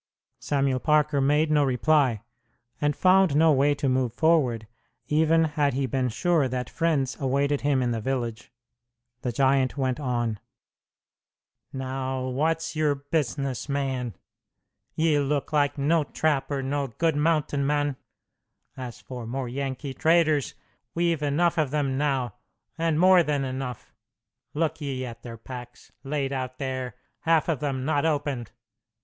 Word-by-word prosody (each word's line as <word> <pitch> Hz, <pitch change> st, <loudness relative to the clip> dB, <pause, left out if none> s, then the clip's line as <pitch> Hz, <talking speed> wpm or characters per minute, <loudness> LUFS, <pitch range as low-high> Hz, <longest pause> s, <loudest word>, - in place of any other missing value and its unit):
Samuel 135 Hz, -2 st, 0 dB
Parker 150 Hz, 0 st, +2 dB
made 150 Hz, +3 st, +2 dB
no 150 Hz, -1 st, +4 dB
reply, 130 Hz, -3 st, +2 dB, 0.6 s
and 145 Hz, -1 st, +1 dB
found 185 Hz, -4 st, +4 dB
no 160 Hz, +1 st, +5 dB
way 145 Hz, +1 st, +3 dB
to 140 Hz, -, -2 dB
move 130 Hz, -2 st, 0 dB
forward, 140 Hz, -9 st, +2 dB, 0.4 s
even 160 Hz, +2 st, +3 dB
had 145 Hz, -3 st, 0 dB
he 135 Hz, 0 st, 0 dB
been 130 Hz, -1 st, 0 dB
sure 165 Hz, +3 st, +1 dB
that 125 Hz, -1 st, -4 dB
friends 150 Hz, -6 st, 0 dB
awaited 140 Hz, +1 st, +1 dB
him 140 Hz, -2 st, +2 dB
in 120 Hz, -, 0 dB
the 115 Hz, -1 st, -2 dB
village. 120 Hz, -2 st, -3 dB, 0.7 s
The 125 Hz, -, -2 dB
giant 135 Hz, +2 st, +2 dB
went 130 Hz, -1 st, 0 dB
on: 120 Hz, -6 st, -1 dB, 1.3 s
"Now, 130 Hz, -1 st, -3 dB
what's 160 Hz, +5 st, -1 dB
your 150 Hz, -2 st, +2 dB
business, 140 Hz, -3 st, -2 dB
man? 130 Hz, -6 st, -2 dB, 0.8 s
Ye 155 Hz, -2 st, +2 dB
look 145 Hz, +1 st, -1 dB
like 145 Hz, -1 st, +2 dB
no 155 Hz, +3 st, +2 dB
trapper 140 Hz, -2 st, -1 dB
nor 140 Hz, +1 st, -1 dB
good 160 Hz, +6 st, 0 dB
mountain 150 Hz, -2 st, +1 dB
man. 145 Hz, 0 st, 0 dB, 0.8 s
As 125 Hz, -3 st, -7 dB
for 125 Hz, -3 st, -7 dB
more 130 Hz, +2 st, -3 dB
Yankee 135 Hz, +2 st, -4 dB
traders, 155 Hz, -2 st, +2 dB, 0.4 s
we've 170 Hz, -2 st, +1 dB
enough 160 Hz, +4 st, +1 dB
of 150 Hz, -3 st, +1 dB
them 140 Hz, -2 st, -1 dB
now, 135 Hz, -4 st, 0 dB, 0.4 s
and 165 Hz, -1 st, 0 dB
more 185 Hz, 0 st, +7 dB
than 145 Hz, -4 st, 0 dB
enough. 130 Hz, -2 st, -5 dB, 0.6 s
Look 160 Hz, 0 st, -1 dB
ye 135 Hz, -3 st, -3 dB
at 115 Hz, -2 st, -9 dB
their 115 Hz, -2 st, -8 dB
packs, 125 Hz, +1 st, -10 dB
laid 140 Hz, -1 st, -2 dB
out 130 Hz, -1 st, -4 dB
there, 130 Hz, -3 st, -4 dB, 0.2 s
half 165 Hz, -1 st, +2 dB
of 160 Hz, -6 st, 0 dB
them 135 Hz, -2 st, -2 dB
not 145 Hz, -1 st, +1 dB
opened! 145 Hz, -7 st, -1 dB
140 Hz, 145 wpm, -26 LUFS, 130-150 Hz, 1.3 s, more